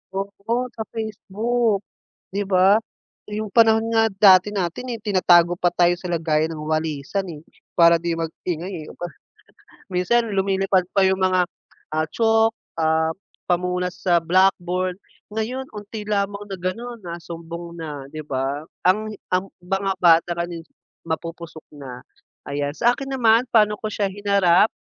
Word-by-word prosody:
Oo, 215 +5 -2
sa 220 - -5
Facebook, 220 0 -1 0.5
'di 205 - 0
ba? 190 0 +4 0.5
Yung 215 +1 -3
panahon 225 -1 +5
nga 225 0 +4
dati 195 -1 +6
natin, 200 +6 -3
eh, - - -17
tinatago 175 -4 +4
pa 175 0 +2
tayo 175 0 +3
sa 180 0 -7
lagayan 160 -2 +1
ng 155 - -6
walisan, 155 +3 -1
eh, 155 -3 -7 0.4
para 170 -1 +7
di 170 -1 -1
mag-ingay, 165 +1 -4
eh, - - -10
aba 175 - -6 0.9
minsan 205 +7 +2
lumilipad 195 -1 +1
pa 195 - +4
yung 190 0 +2
mga, 185 -1 +3 0.5
ah, 155 0 0
chalk, 225 0 +2 0.3
ah, 160 0 +2 0.4
pamunas 180 +1 0
sa 175 -2 +3
blackboard, 185 0 +2 0.4
ngayon 250 +4 -3
unti 210 0 -7
lamang 200 0 -1
na 195 - -5
gano'n 230 +7 -4
nasumbong 170 0 -7
na, 150 -4 -6
'di 155 +2 -7
ba? 135 +1 -2 0.3
Ang 215 +3 +2 0.2
ang 185 +1 0
mga 195 +2 -1
bata 170 0 +5
ngayon, 170 -1 -4 0.4
mapupusok 165 0 -6
na. 130 -3 -8 0.5
Ayan, 145 0 -2
sa 240 +9 +2
akin 270 0 -6
naman 230 -2 +4
pa'no 210 -2 +4
ko 215 +1 -5
siya 205 -1 0
hinarap, 200 -1 +3
185 Hz, 145 wpm, -22 LUFS, 170-210 Hz, 0.9 s, para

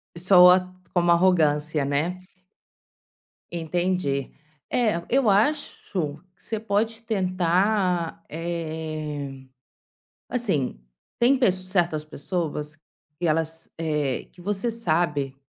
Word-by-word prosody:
Soa, 180 +1 +6 0.2
como 175 -1 +3
arrogância, 155 -4 +3
né? 150 +6 0 1.3
Entendi. 170 -4 -1 0.4
É, 215 -8 +1
eu 260 -3 +3
acho, 260 +10 +2
que - - -24 0.5
você 220 - -3
pode 220 +1 -1
tentar, 185 -3 +1
eh, 155 -4 -4 0.8
assim, 190 - -1 0.4
tem 250 +3 +5
pess 220 -8 +4
certas 170 -5 +1
pessoas, 155 -1 -4 0.4
que 175 - -1
elas, 160 +1 -1
eh, 150 -5 -1
que 180 - -17
você 205 +4 -1
sabe, 160 -10 0
175 Hz, 95 wpm, -25 LUFS, 155-195 Hz, 1.3 s, Soa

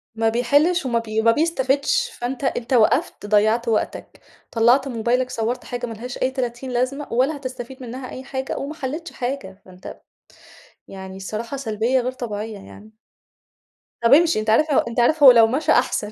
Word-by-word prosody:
ما 225 0 +1
بيحلش 285 +9 +2
وما 235 -2 +1
بي 220 -1 -2
ما 230 +1 +5
بيستفدش، 295 - +1
فأنت 255 - -6
أنت 255 -1 -2
وقفت، 220 -3 +2
ضيعت 215 +3 +2
وقتك، 225 -2 -2 0.3
طلعت 245 +4 +3
موبايلك 245 +1 0
صورت 235 0 -2
حاجة 245 -1 -5
ملهاش 235 +2 -7
أي 260 - 0
تلاتين 255 0 -4
لازمة 255 +4 -2
ولا 265 +6 +1
هتستفيد 260 -1 -8
منها 255 +2 -7
أي 260 - -8
حاجة 265 0 -4
وما 280 +3 -5
حليتش 305 +3 -5
حاجة. 245 -8 -5
ما 185 - -15
أنت 180 0 -11 0.9
يعني 190 -1 -9
الصراحة 215 +7 -5
سلبية 235 0 0
غير 250 +1 -3
طبيعية 220 -4 -6
يعني. 210 +2 -14 1.1
طَب 230 +3 +5
امشِ. 330 +3 +5
أنت 215 0 -2
عارف 305 +8 +3
ل - - +2
أنت 235 +1 -3
عارف 295 +5 +3
هو 265 - +11
لو 230 -2 +6
مشى 290 +6 0
أحسن، 210 -7 +1
245 Hz, 170 wpm, -21 LUFS, 225-270 Hz, 1.1 s, هو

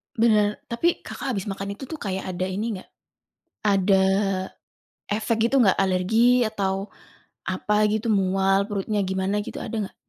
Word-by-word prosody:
Benar, 215 -2 +2
tapi 335 +9 0
Kakak 270 -3 -4
habis 195 - -2
makan 195 +1 -4
itu 255 +5 -10
tuh 320 - -5
kayak 190 -4 -4
ada 185 0 -2
ini 205 +2 -3
nggak? - - -14 0.8
Ada, 195 -1 +3 1.1
efek 220 +2 0
gitu 270 0 +4
gak, 195 -5 +4
alergi 220 +7 +3
atau 195 -1 -2 0.5
apa 210 +3 0
gitu 215 +2 -1
mual 195 -1 +2
perutnya 205 +1 -1
gimana 190 +2 -1
gitu - - -8
ada - - -5
nggak? - - -29
205 Hz, 150 wpm, -24 LUFS, 190-220 Hz, 1.1 s, gitu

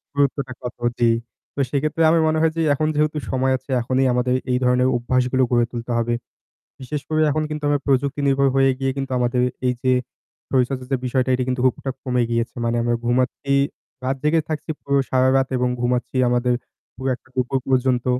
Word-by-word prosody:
গুরুত্বটা 140 -2 0
কত, 125 0 -6 0.2
জ্বি। 115 -1 +4 0.4
তো - - -6
সেক্ষেত্রে 150 +3 0
আমি 165 - +4
মনে 155 0 +1
হয় 160 -1 +3
যে - - +1
এখন 155 +2 0
যেহেতু 150 +1 +1
সময় 130 0 +1
আছে 130 +2 -25
এখনই 130 +3 +1
আমাদের 125 +1 +1 0.2
এই 125 - +2
ধরনের 125 +1 +3
অভ্যাসগুলো 130 +1 +1
গড়ে 120 -1 +3
তুলতে 120 0 -5
হবে। 120 0 0 0.7
বিশেষ 145 +2 -4
করে 155 0 +1
এখন 155 +2 0
কিন্তু 150 -1 -5
আমরা 145 -1 +2
প্রযুক্তি 140 +1 +1
নির্ভর 135 0 +3
হয়ে 135 0 +5
গিয়ে 135 0 0
কিন্তু 135 -1 -3
আমাদের 125 0 +1 0.2
এই 125 - +2
যে, 130 - +3 0.6
শরীরচর্চা 130 0 0
যে 135 - +2
বিষয়টা 130 +1 0
এটা 125 - -1
কিন্তু 125 -1 -1
খুব 130 - +4
একটা 135 - -2
কমে 125 -2 +1
গিয়েছে। 115 +2 -1
মানে 115 0 0
আমরা 120 0 +1
ঘুমাচ্ছি 130 +3 0 0.5
রাত 135 +1 0
জেগে 160 +1 +3
থাকছি, 155 +1 -4
পুরো 140 0 +1
সারারাত 130 +1 +3
এবং 125 0 +1
ঘুমাচ্ছি 125 +1 -1
আমাদের 125 0 +2 0.4
পুরো 130 +2 -3
একটা 130 - -25
দুপুর 130 +1 0
পর্যন্ত। 130 -1 +2
130 Hz, 190 wpm, -22 LUFS, 125-140 Hz, 0.7 s, হয়ে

